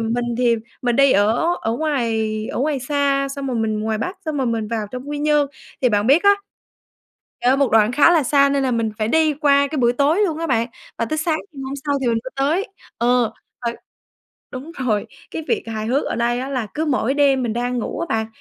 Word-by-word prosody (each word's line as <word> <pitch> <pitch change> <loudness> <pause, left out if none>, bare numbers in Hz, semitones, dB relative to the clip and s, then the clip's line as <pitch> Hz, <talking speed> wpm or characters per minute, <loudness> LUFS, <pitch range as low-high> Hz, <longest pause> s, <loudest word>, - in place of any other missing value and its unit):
mình 230 +2 -1
thì 240 -2 +3 0.3
mình 240 -2 +1
đi 275 -1 +5
ở 230 - +2
ở 225 - -1
ngoài 230 -8 -1 0.2
ở - - -3
ngoài 285 -2 0
xa, 275 0 0
xong 275 0 -5
rồi 255 -3 -2
mình 215 -1 -1
ngoài 220 0 -1
Bắc, 365 - -3
xong 310 -2 -3
rồi 265 - 0
mình 225 -2 -1
vào 220 -3 -2
trong 255 +2 -7
Quy 295 - -3
Nhơn. 295 -1 +2 0.3
Thì 255 - +4
bạn 210 -1 +1
biết 290 +8 +5
á 405 0 +6 1.1
trời 250 - +5
ơi 265 - +4
một 280 -3 +2
đoạn 220 +1 +4
khá 295 +5 +5
là 325 -4 +4
xa 280 +1 +4
nên 275 -1 +1
là 260 - +1
mình 230 -2 0
phải 215 - 0
đi 315 +2 +3
qua 280 -1 +3
cái 310 - -3
buổi 240 -1 +3
tối 290 +8 +2
luôn 320 -4 -2
á 330 - -2
bạn, 235 -4 +1 0.3
và - - +1
tới 310 +7 -3
sáng 310 0 0
ngày 275 -2 -8
hôm 265 +1 -4
sau 285 - +1
thì 260 - -2
mình 230 -1 +2
mới 260 - -6
tới. 315 - +1 0.3
Ờ, 240 -1 +2 0.3
trời 235 - -2 0.8
đúng 280 +5 -7
rồi, 230 - -1 0.2
cái 320 - -5
việc 450 - +1
hài 220 -1 -4
hước 265 +5 +1
ở - - -2
đây 240 +1 0
á 265 - -4
là 255 -5 -2
cứ 315 +1 -1
mỗi 265 -3 0
đêm 275 -3 +3
mình 235 - -1
đang 245 +2 -2
ngủ - - -4
á 335 - -2
bạn, 220 0 0
260 Hz, 245 wpm, -20 LUFS, 230-290 Hz, 1.1 s, á